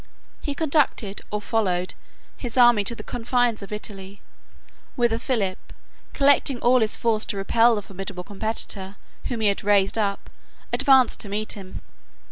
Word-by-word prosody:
He 285 - -4
conducted, 280 -10 0
or 210 - -2
followed, 185 -6 -1 0.4
his 245 -1 -5
army 240 -4 +6
to 235 - 0
the - - -9
confines 245 -1 0
of 200 - -9
Italy, 200 -2 -7 0.8
whither 235 -2 +1
Philip, 200 -9 -1 0.5
collecting 280 -2 +3
all 250 +2 +4
his 220 -2 +3
force 225 -2 0
to 200 - -3
repel 230 +4 +3
the 205 - -4
formidable 195 -1 -7
competitor 205 -1 -4 0.3
whom 235 -3 -3
he 215 - +3
had 200 - -2
raised 205 +1 +2
up, 200 -2 -2 0.4
advanced 270 -3 +4
to 205 - -5
meet 215 +2 -2
him. 190 -2 -9
215 Hz, 150 wpm, -23 LUFS, 200-240 Hz, 0.8 s, army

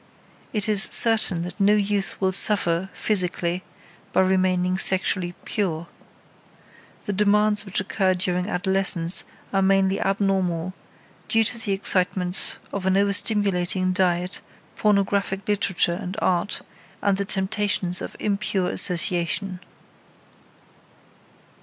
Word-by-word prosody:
It 210 -1 -2
is 210 -1 +3
certain 220 -7 +3
that 175 0 -7
no 205 +1 +4
youth 205 -1 -1
will 190 -1 +1
suffer, 190 -2 +3
physically, 180 -3 -1 0.5
by - - +3
remaining 185 -1 +1
sexually 185 -2 0
pure. 170 -6 -2 1.2
The 205 - -3
demands 210 +1 +2
which 195 - -1
occur 190 -1 0
during 180 +1 -1
adolescence 185 -2 +2 0.3
are 195 - +2
mainly 195 0 +2
abnormal, 190 -3 0 0.5
due 225 0 +3
to 225 - 0
the 205 -3 -1
excitements 185 -2 0 0.2
of 190 -1 -3
an 190 - +2
overstimulating 195 -2 +1
diet, 180 -1 0 0.3
pornographic 200 -1 0
literature 190 -4 0
and 190 +1 -6
art, 180 0 -1 0.4
and 200 -1 +2
the 200 - -1
temptations 195 -2 0
of - - -7
impure 200 -3 -1
association. 180 +1 0
190 Hz, 110 wpm, -23 LUFS, 180-200 Hz, 1.2 s, no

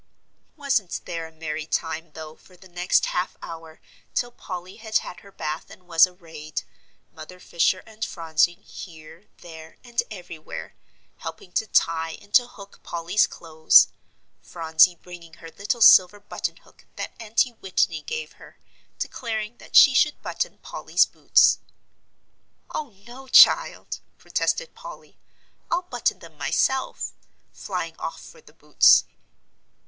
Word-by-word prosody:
Wasn't 270 - -1
there 165 -1 -5
a - - -17
merry 160 -1 -5
time, 160 -1 -3
though, 155 -1 -9
for 185 - -21
the 190 - -16
next 180 0 +1
half 180 +1 -3
hour, 165 -1 -10 0.4
till 245 0 -1
Polly 185 -4 -8
had 220 -1 0
had 180 - -7
her 200 - -17
bath, 155 -4 -5
and 180 -1 -16
was 165 +1 +6
arrayed, 160 -4 -8 0.5
Mother 180 +4 -12
Fisher 180 +1 0
and 220 0 -9
Phronsie 165 -1 +1
here, 170 -2 -13 0.2
there, 160 -2 -12
and 240 -1 -1
everywhere, 175 -6 -9 0.4
helping 405 - -9
to 220 - -1
tie 165 -4 +1
and 205 0 -21
to 245 -1 +5
hook 200 -4 -14
Polly's 170 +4 0
clothes 160 -1 +4 0.5
Phronsie 165 +1 +3
bringing 170 -1 -13
her 165 -1 -12
little 220 +7 -3
silver 190 -1 +7
button 205 - -5
hook - - -23
that - - -6
Auntie 230 +2 0
Whitney 185 -6 -1
gave 460 - -5
her, - - -17 0.4
declaring 220 -1 -4
that - - -13
she 270 - +9
should 300 +3 +2
button - - -3
Polly's - - +1
boots. - - +3 1.1
"Oh, 300 -3 -4 0.2
no, 255 +3 -12
child," - - +5 0.2
protested - - -2
Polly. - - -12 0.5
"I'll 345 +1 0
button 355 - -1
them - - -16
myself," 265 0 -1 0.4
flying - - -5
off - - -5
for 480 - -15
the - - -19
boots. - - +5
180 Hz, 140 wpm, -24 LUFS, 165-225 Hz, 1.1 s, she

